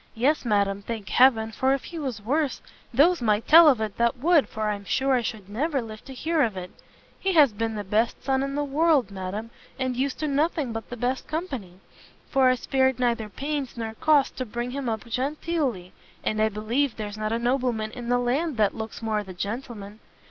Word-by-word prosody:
"Yes, 265 +5 +1
madam, 200 -2 +1
thank 215 -2 -6
heaven, 225 -4 +4
for 265 +4 +2
if 275 - -7
he 335 - -7
was 250 -8 -4
worse, 285 +4 0 0.3
those 310 +7 +4
might 215 -1 +1
tell 330 +1 +9
of 265 -6 +5
it 215 -2 -3
that 235 +1 +2
would, 315 +3 +3
for 215 -1 -3
I'm 200 -1 -5
sure 265 +7 +1
I 250 - +3
should 215 -4 -5
never 275 +8 -1
live 220 -3 -8
to 270 - -9
hear 320 +4 0
of 220 -7 +1
it. 180 0 -6 0.5
He 385 0 0
has 290 -8 +6
been 225 +1 -2
the 205 - -3
best 215 +4 0
son 265 -1 +1
in 275 0 -2
the 290 - 0
world, 290 -4 +2
madam, 200 +4 -5 0.3
and 255 -1 -1
used 265 +2 -1
[to] 305 - 0
nothing 290 -3 0
but 225 0 -6
the 245 - -6
best 250 +3 -2
company, 280 - -4 0.6
for 265 -2 +4
I 255 - +3
spared 265 0 +1
neither 235 -3 0
pains 280 +1 -4
nor 225 -1 -4
cost 290 +3 +2
to 255 - -2
bring 240 +3 -4
him 270 -2 -3
up 220 +1 -3
genteely, 260 - -2 0.3
and 215 0 0
I 220 - +3
believe 225 +6 -1
there's 210 -2 -5
not 215 0 -2
a 230 - +1
nobleman 240 -3 0
in 240 -1 -7
the 245 - +3
land 260 +4 0
that 210 -2 +3
looks 220 +1 -7
more 215 -1 0
the 190 -2 -10
gentleman. 210 0 -6
245 Hz, 215 wpm, -25 LUFS, 215-275 Hz, 0.6 s, tell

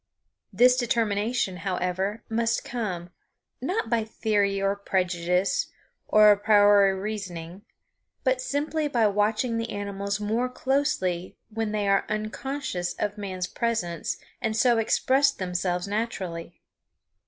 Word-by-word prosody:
This 250 +1 +5
determination, 225 -4 0
however, 190 +3 -2
must 230 0 0
come, 185 -8 -4 0.5
not 380 - -1
by 230 -2 +1
theory 205 -3 0
or 195 0 +1
prejudice 180 -1 0 0.4
or 215 0 +7
a 205 - +4
priori 205 -1 +5
reasoning, 190 -3 -5 0.6
but 260 -1 +1
simply 295 +3 -1
by 240 -6 +2
watching 215 +3 +1
the 230 0 -3
animals 200 0 -3
more 225 +4 0
closely 250 -10 -1
when 220 -1 -2
they 210 -1 -1
are 195 0 +2
unconscious 215 -2 -3
of 210 0 -3
man's 185 -3 -3
presence 185 -6 -2 0.2
and 220 -1 -1
so 235 -1 +4
express 265 +5 +3
themselves 180 -5 -2
naturally. 185 -6 -4
210 Hz, 120 wpm, -26 LUFS, 190-230 Hz, 0.6 s, or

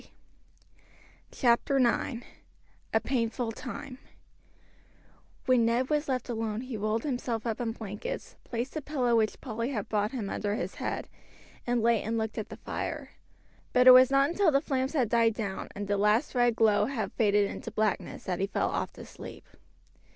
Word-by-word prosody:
CHAPTER 245 +3 +2
IX: 240 -1 +1 0.7
A 220 - +3
PAINFUL 235 -1 -1
TIME 255 +2 -7 1.5
When 255 -2 +4
Ned 245 +4 +1
was 300 -1 +1
left 255 -2 -1
alone 225 -2 -2
he 255 -2 -6
rolled 215 +2 -1
himself 245 -5 -2
up 230 0 -2
in 230 -2 -1
the - - -11
blankets, 220 - -6
placed 240 +4 -4
a 310 - -2
pillow 255 -5 +1
which 220 -2 +1
Polly 230 -1 -3
had 220 -6 -3
brought 210 -1 +1
him 235 -7 -3
under 205 +1 -2
his 255 - -3
head, - - -3 0.6
and 240 -2 +1
lay 230 -2 +3
and 225 +2 -2
looked 220 0 -2
at 215 - -5
the - - -8
fire; - - -5 0.6
but 250 0 +5
it 255 - +12
was 255 0 +8
not 275 0 +4
until 385 0 +3
the 275 -2 +4
flames 265 -2 -1
had 260 -7 +2
died 230 -1 +3
down, 200 -4 -4
and 200 0 -4
the 205 0 +1
last 210 +7 +2
red 240 -2 +3
glow 210 -2 +4
had 220 -6 -3
faded 205 -2 +3
into - - -6
blackness 215 -3 -1
that 180 -2 -2
he 195 - +1
fell - - 0
off - - -2
to - - -10
sleep. - - -10
235 Hz, 180 wpm, -29 LUFS, 215-255 Hz, 1.5 s, it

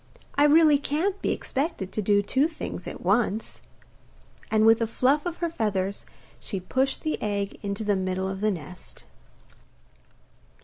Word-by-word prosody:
I 290 - +4
really 300 -1 +6
can't 355 +8 -1
be - - 0
expected 265 - -2
to 215 - -2
do 205 0 +3
two 265 +8 +2
things 315 - -7
at - - -7
once.' 210 +3 0 0.9
And 220 0 +3
with 225 +1 +6
a 230 - +1
fluff 275 +8 +1
of 345 - -4
her 340 -1 -1
feathers 200 - -2 0.3
she 195 - -4
pushed 260 +9 -1
the 310 - -2
egg 200 -1 -2
into 200 +1 -3
the 205 -1 +1
middle 185 0 -1
of 190 0 -5
the 215 - +2
nest. 180 -1 -7
220 Hz, 160 wpm, -26 LUFS, 195-290 Hz, 0.9 s, really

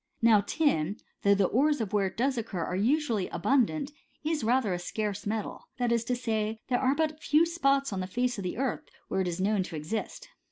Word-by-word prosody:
Now 220 -3 +6
tin, 205 - 0 0.2
though 200 0 +5
the 200 -1 +3
ores 290 +8 +2
of 220 -4 -2
it - - -17
where 200 -2 +2
it - - -9
does 265 +3 +1
occur 215 -7 -3
are 180 - -3
usually 230 -2 +1
abundant, 275 +2 +1 0.3
is 310 -2 -1
rather 230 -3 +2
a 175 - -2
scarce 205 +2 -3
metal: 215 0 -4
that 245 -2 0
is 235 -1 +2
to 250 - 0
say, 220 -2 -2
there 245 - +2
are 265 +1 +3
but 310 0 -1
few 305 +3 +4
spots 275 -7 +1
on 190 - -2
the 185 - -3
face 245 +3 -1
of - - -4
the 180 - -3
earth 265 0 -2 0.2
where 190 - 0
it 185 - -1
is 175 0 -3
known 200 +1 +2
to 180 - -5
exist. 215 - -4
225 Hz, 230 wpm, -29 LUFS, 200-275 Hz, 0.3 s, Now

